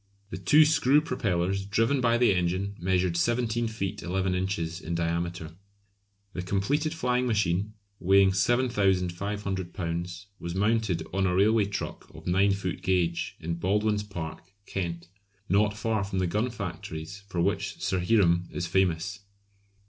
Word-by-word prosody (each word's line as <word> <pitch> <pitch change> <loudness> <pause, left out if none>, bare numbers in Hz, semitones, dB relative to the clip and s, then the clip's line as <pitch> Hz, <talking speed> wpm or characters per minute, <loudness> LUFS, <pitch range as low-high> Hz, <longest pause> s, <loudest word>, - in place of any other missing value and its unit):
The - - -4
two 150 - +6
screw 150 -2 +4
propellers 100 - -1
driven 115 +7 +1
by 120 -1 +3
the 120 -4 +4
engine 95 +3 -1
measured 90 -1 +1
17 120 +5 +1
feet 105 -2 -4
11 95 +1 -1
inches 90 -2 -2
in 85 +2 -3
diameter. 85 -1 -2 0.8
The 90 - -3
completed 100 - 0
flying 125 -5 0
machine, 105 -2 0 0.2
weighing 95 +1 +5
7500 95 -4 0
lbs., 85 0 -4
was 85 +1 -5
mounted 105 -4 +1
on 95 0 +2
a 90 - +1
railway 105 +2 +4
truck 100 0 -5
of - - -12
9 95 +3 +3
foot 95 -3 -3
gauge, 90 -3 0
in 85 +1 -4
Baldwyn's 105 +3 +1
Park, 85 -6 -6 0.2
Kent, 85 -4 -4 0.4
not 105 +2 +2
far 110 -1 0
from 95 0 -4
the 95 - +2
gun 105 +8 0
factories 90 -4 -6
for 90 -3 -4
which 85 - -1
Sir 95 - 0
Hiram 90 -3 +3
is 85 - -3
famous. 90 +1 0
95 Hz, 145 wpm, -28 LUFS, 85-105 Hz, 0.8 s, two